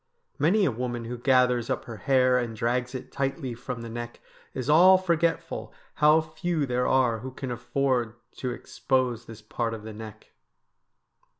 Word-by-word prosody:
Many 190 Hz, +8 st, +3 dB
a 140 Hz, -, +2 dB
woman 120 Hz, 0 st, -4 dB
who 120 Hz, +2 st, -4 dB
gathers 125 Hz, -1 st, +2 dB
up -, -, -2 dB
her 115 Hz, -2 st, -8 dB
hair 130 Hz, 0 st, +3 dB
and 120 Hz, -2 st, -3 dB
drags 125 Hz, +3 st, -1 dB
it 130 Hz, -, -7 dB
tightly 135 Hz, -1 st, -2 dB
from 120 Hz, 0 st, -6 dB
the -, -, -6 dB
neck 120 Hz, +1 st, -7 dB, 0.4 s
is 130 Hz, -1 st, -4 dB
all 180 Hz, +5 st, +7 dB
forgetful 170 Hz, -2 st, -1 dB, 0.2 s
how 150 Hz, +1 st, +5 dB
few 160 Hz, 0 st, -2 dB
there 125 Hz, -1 st, 0 dB
are 125 Hz, -4 st, +2 dB
who 130 Hz, +4 st, -6 dB
can 130 Hz, 0 st, -6 dB
afford 120 Hz, -1 st, -1 dB, 0.2 s
to 130 Hz, -, -3 dB
expose 125 Hz, -1 st, -1 dB
this 115 Hz, -1 st, -11 dB
part 115 Hz, +1 st, -2 dB
of 105 Hz, -, -10 dB
the 110 Hz, 0 st, -8 dB
neck. 110 Hz, 0 st, -11 dB
125 Hz, 170 wpm, -27 LUFS, 120-140 Hz, 0.4 s, all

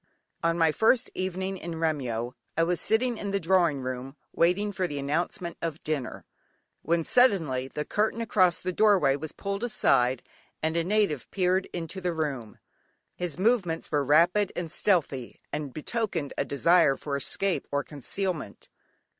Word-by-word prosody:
"Yeomen -, -, -43 dB
of -, -, -41 dB
the -, -, -48 dB
Guard." 165 Hz, -, -1 dB
On 165 Hz, -, 0 dB
my 165 Hz, -2 st, +4 dB
first 230 Hz, +8 st, +3 dB
evening 190 Hz, +1 st, -3 dB
in 170 Hz, -1 st, -6 dB
Remyo 130 Hz, -7 st, -2 dB, 0.2 s
I 165 Hz, -, +4 dB
was 175 Hz, +1 st, 0 dB
sitting 235 Hz, +1 st, +1 dB
in 200 Hz, -, -3 dB
the 200 Hz, 0 st, 0 dB
drawing 170 Hz, -5 st, +2 dB
room, 130 Hz, +2 st, -5 dB, 0.2 s
waiting 180 Hz, +5 st, +2 dB
for 185 Hz, -2 st, -1 dB
the 145 Hz, -, -5 dB
announcement 165 Hz, +4 st, -2 dB
of 165 Hz, -2 st, -4 dB
dinner, 150 Hz, -5 st, -3 dB, 0.6 s
when 170 Hz, +1 st, +1 dB
suddenly, 160 Hz, -, +3 dB
the 150 Hz, +2 st, -5 dB
curtain 215 Hz, +2 st, 0 dB
across 185 Hz, -6 st, +3 dB
the 185 Hz, -, -3 dB
doorway 190 Hz, -10 st, +4 dB
was 150 Hz, +2 st, -5 dB
pulled 200 Hz, +2 st, -4 dB
aside, 130 Hz, -, +2 dB, 0.4 s
and 160 Hz, +1 st, 0 dB
a 170 Hz, -, +1 dB
native 190 Hz, -, 0 dB
peered 185 Hz, 0 st, +1 dB
into 170 Hz, +2 st, -5 dB
the 180 Hz, -1 st, -1 dB
room. 140 Hz, -9 st, -4 dB, 0.6 s
His 175 Hz, -4 st, -4 dB
movements 190 Hz, -5 st, +1 dB
were 145 Hz, -2 st, +2 dB
rapid 175 Hz, +8 st, +4 dB
and 170 Hz, -3 st, -4 dB
stealthy, 145 Hz, -, 0 dB
and 145 Hz, -3 st, -3 dB
betokened 165 Hz, -, -3 dB
a 140 Hz, -, -1 dB
desire 155 Hz, +1 st, +3 dB
for 145 Hz, -2 st, -4 dB
escape 180 Hz, +7 st, +1 dB
or 145 Hz, 0 st, 0 dB
concealment. 155 Hz, -, -4 dB
170 Hz, 170 wpm, -27 LUFS, 145-190 Hz, 0.6 s, my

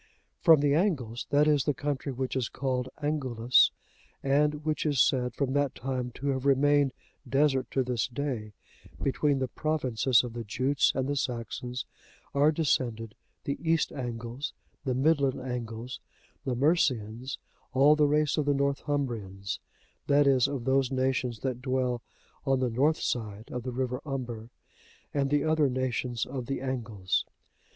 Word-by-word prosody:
From 160 Hz, -4 st, +6 dB
the 145 Hz, -1 st, +3 dB
Angles, 145 Hz, -, 0 dB
that 145 Hz, +1 st, +4 dB
is, 145 Hz, -3 st, +3 dB
the 145 Hz, -, +1 dB
country 145 Hz, -2 st, -2 dB
which 130 Hz, 0 st, -3 dB
is 130 Hz, -3 st, 0 dB
called 130 Hz, -2 st, -2 dB
Angulus,(87) 130 Hz, -5 st, +2 dB, 0.5 s
and 150 Hz, +1 st, +2 dB
which 155 Hz, -1 st, 0 dB
is 145 Hz, -4 st, +1 dB
said, 125 Hz, -1 st, +2 dB
from 135 Hz, -2 st, -1 dB
that 145 Hz, -1 st, +1 dB
time, 130 Hz, -1 st, -3 dB
to 140 Hz, +2 st, -2 dB
have 130 Hz, -1 st, -1 dB
remained 140 Hz, 0 st, +4 dB, 0.4 s
desert 135 Hz, -2 st, +2 dB
to 135 Hz, -, +1 dB
this 125 Hz, -2 st, -1 dB
day, 125 Hz, -5 st, -4 dB, 0.5 s
between 140 Hz, +1 st, +1 dB
the 130 Hz, -1 st, -1 dB
provinces 130 Hz, -5 st, +1 dB
of 120 Hz, -2 st, -6 dB
the 120 Hz, 0 st, -4 dB
Jutes 130 Hz, +6 st, +2 dB
and 130 Hz, 0 st, 0 dB
the 145 Hz, -, -1 dB
Saxons, 125 Hz, 0 st, -3 dB, 0.5 s
are 145 Hz, +2 st, +4 dB
descended 120 Hz, -8 st, 0 dB, 0.3 s
the 140 Hz, -, -3 dB
East 165 Hz, -1 st, +1 dB
Angles, 120 Hz, 0 st, -5 dB, 0.3 s
the 130 Hz, -2 st, 0 dB
Midland 140 Hz, -1 st, +2 dB
Angles, 125 Hz, -1 st, -5 dB, 0.5 s
the 130 Hz, -, 0 dB
Mercians, 130 Hz, -4 st, +1 dB, 0.3 s
all 140 Hz, +3 st, +6 dB
the 150 Hz, -1 st, +4 dB
race 150 Hz, 0 st, +2 dB
of 150 Hz, -, +1 dB
the 145 Hz, 0 st, +2 dB
Northumbrians, 130 Hz, -9 st, -2 dB, 0.5 s
that 145 Hz, 0 st, +5 dB
is, 135 Hz, -2 st, +4 dB
of 140 Hz, -3 st, -4 dB
those 135 Hz, -1 st, +2 dB
nations 130 Hz, -3 st, 0 dB
that 130 Hz, -2 st, -2 dB
dwell 130 Hz, -2 st, 0 dB, 0.4 s
on 135 Hz, -1 st, +2 dB
the 125 Hz, -2 st, 0 dB
north 145 Hz, +7 st, +2 dB
side 110 Hz, -2 st, -3 dB
of 125 Hz, -, -3 dB
the 125 Hz, +1 st, -4 dB
river 125 Hz, 0 st, -2 dB
Humber, 120 Hz, -5 st, -5 dB, 0.6 s
and 140 Hz, -1 st, +1 dB
the 145 Hz, 0 st, +2 dB
other 155 Hz, -2 st, +3 dB
nations 125 Hz, -2 st, -1 dB
of 130 Hz, -3 st, -5 dB
the 135 Hz, -, -2 dB
Angles. 115 Hz, -8 st, -1 dB
130 Hz, 155 wpm, -29 LUFS, 125-145 Hz, 0.6 s, From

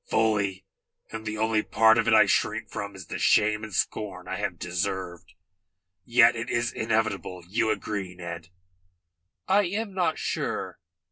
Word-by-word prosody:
"Fully, 100 Hz, -4 st, +1 dB, 0.5 s
and 110 Hz, -1 st, -6 dB
the 110 Hz, 0 st, -3 dB
only 110 Hz, 0 st, +2 dB
part 110 Hz, +1 st, +4 dB
of 115 Hz, -, +1 dB
it -, -, +4 dB
I 110 Hz, -1 st, +7 dB
shrink 100 Hz, -, 0 dB
from 100 Hz, -1 st, -5 dB
is 95 Hz, -2 st, -9 dB
the -, -, -6 dB
shame 105 Hz, 0 st, +3 dB
and 110 Hz, -, -7 dB
scorn 90 Hz, -2 st, -2 dB
I -, -, -3 dB
have -, -, -3 dB
deserved. 90 Hz, +1 st, -4 dB, 0.7 s
Yet 120 Hz, 0 st, +5 dB
it 115 Hz, +1 st, -4 dB
is 120 Hz, 0 st, 0 dB
inevitable. 100 Hz, -5 st, -1 dB
You 110 Hz, +3 st, 0 dB
agree, 100 Hz, -3 st, -3 dB
Ned?" 85 Hz, -1 st, -7 dB, 1.0 s
"I 200 Hz, +1 st, +4 dB
am 200 Hz, +3 st, -3 dB
not 175 Hz, -4 st, 0 dB
sure. -, -, -3 dB
110 Hz, 155 wpm, -26 LUFS, 95-115 Hz, 1.0 s, I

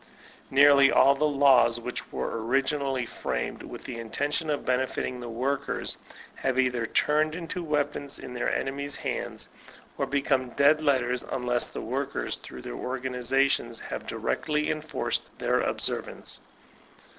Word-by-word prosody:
Nearly 140 Hz, 0 st, +7 dB
all 135 Hz, +1 st, +6 dB
the 150 Hz, +2 st, +1 dB
laws 135 Hz, -5 st, +5 dB
which 125 Hz, +1 st, -5 dB
were 115 Hz, -, -3 dB
originally 135 Hz, +1 st, +1 dB
framed 60 Hz, -, -3 dB
with -, -, -9 dB
the 120 Hz, -2 st, -6 dB
intention 145 Hz, +7 st, -2 dB
of 145 Hz, -, -1 dB
benefiting 125 Hz, 0 st, -1 dB
the 120 Hz, -1 st, -6 dB
workers, 135 Hz, +4 st, -2 dB, 0.4 s
have 130 Hz, -1 st, -1 dB
either 125 Hz, -3 st, +1 dB
turned 155 Hz, +4 st, +2 dB
into 175 Hz, +1 st, -4 dB
weapons 145 Hz, -2 st, -1 dB
in 125 Hz, -, -8 dB
their 120 Hz, -, -1 dB
enemies' 140 Hz, +1 st, -2 dB
hands, -, -, -4 dB, 0.5 s
or -, -, +1 dB
become 135 Hz, -2 st, +1 dB
dead 145 Hz, +5 st, +4 dB
letters, 125 Hz, -4 st, +2 dB
unless 125 Hz, -2 st, 0 dB
the -, -, -6 dB
workers 135 Hz, +4 st, -3 dB
through -, -, -10 dB
their -, -, -6 dB
organizations 125 Hz, -, 0 dB
have -, -, -6 dB
directly 150 Hz, -1 st, -1 dB
enforced 155 Hz, -2 st, -2 dB
the -, -, +1 dB
observance. -, -, -1 dB
135 Hz, 135 wpm, -27 LUFS, 125-145 Hz, 0.5 s, Nearly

